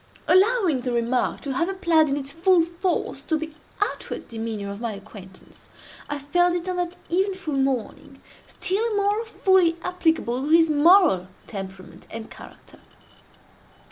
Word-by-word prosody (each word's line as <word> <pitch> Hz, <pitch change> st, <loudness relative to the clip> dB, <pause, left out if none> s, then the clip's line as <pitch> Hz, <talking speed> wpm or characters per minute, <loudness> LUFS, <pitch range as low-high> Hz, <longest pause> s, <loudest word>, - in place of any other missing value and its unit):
Allowing 375 Hz, -, +3 dB
the 250 Hz, 0 st, -3 dB
remark 240 Hz, +1 st, 0 dB
to 275 Hz, -, -4 dB
have 335 Hz, +7 st, 0 dB
applied 340 Hz, -5 st, +2 dB
in 275 Hz, -, 0 dB
its 275 Hz, -1 st, -5 dB
full 345 Hz, +1 st, +4 dB
force 345 Hz, +2 st, -2 dB
to 315 Hz, -, -1 dB
the 315 Hz, 0 st, -6 dB, 0.3 s
outward 410 Hz, -, -3 dB
demeanor 220 Hz, -3 st, -5 dB
of 200 Hz, +2 st, -8 dB
my 230 Hz, -2 st, -2 dB
acquaintance, 195 Hz, -2 st, -14 dB, 0.4 s
I 290 Hz, -, -2 dB
felt 350 Hz, +5 st, +1 dB
it, 350 Hz, +1 st, -3 dB
on 365 Hz, -1 st, -2 dB
that 355 Hz, 0 st, -2 dB, 0.2 s
eventful 380 Hz, -3 st, -1 dB
morning, 270 Hz, +1 st, -2 dB, 0.3 s
still 415 Hz, +4 st, -1 dB
more 410 Hz, +2 st, +1 dB
fully 375 Hz, -6 st, +3 dB
applicable 320 Hz, -8 st, 0 dB
to 285 Hz, -, -3 dB
his 325 Hz, 0 st, +5 dB
moral 300 Hz, -, +5 dB, 0.2 s
temperament 190 Hz, -2 st, -9 dB
and 225 Hz, 0 st, -8 dB
character. -, -, -14 dB
320 Hz, 145 wpm, -24 LUFS, 245-365 Hz, 0.4 s, his